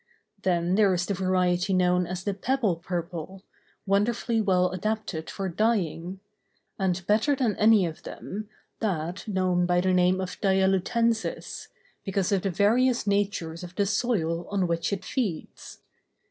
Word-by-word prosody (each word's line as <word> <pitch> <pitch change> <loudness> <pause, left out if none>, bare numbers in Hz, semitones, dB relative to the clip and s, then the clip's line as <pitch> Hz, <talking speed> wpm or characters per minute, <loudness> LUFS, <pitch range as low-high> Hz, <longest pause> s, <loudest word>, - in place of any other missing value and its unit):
Then 175 -1 +1
there 200 -1 +4
is 175 0 -1
the 200 - -1
variety 185 0 +1
known 180 -1 +2
as 180 +1 -5
the 205 - -1
pebble 215 -2 0
purple, 175 +2 -5 0.4
wonderfully 225 +3 +1
well 180 -3 +2
adapted 185 -4 -3
for 195 -1 -4
dyeing; 185 -2 -1 0.6
and, 190 -2 0
better 220 +8 +3
than 245 -6 0
any 215 -3 +5
of 160 -2 -6
them, 215 +2 -7 0.3
that 180 -3 -3
known 185 -3 +1
by 175 0 +3
the 185 +1 +2
name 180 +1 +3
of 185 -1 -5
"dialutensis," 195 +4 0 0.4
because 195 -1 -1
of 195 -2 +2
the 195 - -1
various 230 +7 +2
natures 200 -5 -1
of 180 +1 -9
the 200 - +1
soil 190 -6 0
on 200 -2 0
which 170 +1 -1
it 195 -1 -3
feeds. 210 - -4
190 Hz, 145 wpm, -26 LUFS, 180-210 Hz, 0.6 s, any